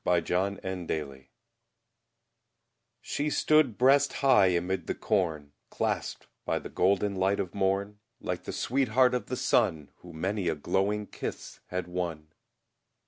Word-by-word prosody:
Thomas 85 -2 +1 0.4
Hood 95 -2 -5
Ruth 70 -4 -4 1.8
SHE 145 +1 -2
stood 150 -6 +3
breast 135 +2 +4
high 130 -8 +5
amid 90 0 -1
the - - -2
corn, 80 -8 -1 0.2
Clasped - - -2 0.2
by - - 0
the - - -7
golden 100 +1 +1
light 95 +2 +1
of 90 - -3
morn, 100 +1 -1 0.2
Like 90 0 -4
the - - -4
sweetheart 130 0 +2
of 125 - -2
the 125 - -3
sun, 80 - +1
Who 90 - -13
many 95 +4 -2
a 80 - +1
glowing 100 +7 0
kiss - - -7
had 90 -1 -3
won. 85 -4 -4
95 Hz, 140 wpm, -29 LUFS, 85-110 Hz, 1.8 s, high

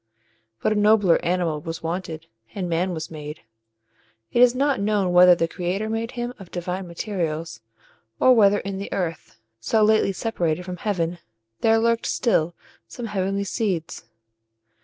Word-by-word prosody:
But - - +2
a 210 - 0
nobler 205 -4 +4
animal 170 -3 0
was 165 +1 -6
wanted, 165 -1 -4 0.3
and 190 -3 -2
Man 175 +2 0
was 160 -2 -5
made. 150 -1 -8 0.9
It 240 - +2
is 250 0 +6
not 275 -1 +1
known 200 -3 +1
whether 180 0 +8
the 165 -1 0
creator 185 +5 -3
made 225 +1 -3
him 240 0 -4
of 190 -3 -11
divine 180 +1 -4
materials, 165 - -4 0.6
or 255 - +6
whether 205 -3 +5
in 195 -1 -5
the 200 - -6
earth, 175 -4 -4 0.2
so 215 - +2
lately 215 -2 +3
separated 180 -5 -2
from 180 0 -6
heaven, 175 -3 -2 0.4
there 225 0 +4
lurked 230 0 +1
still 175 -8 +1 0.3
some 240 - -7
heavenly 195 -1 -1
seeds. 190 -5 -3
185 Hz, 155 wpm, -23 LUFS, 170-215 Hz, 0.9 s, whether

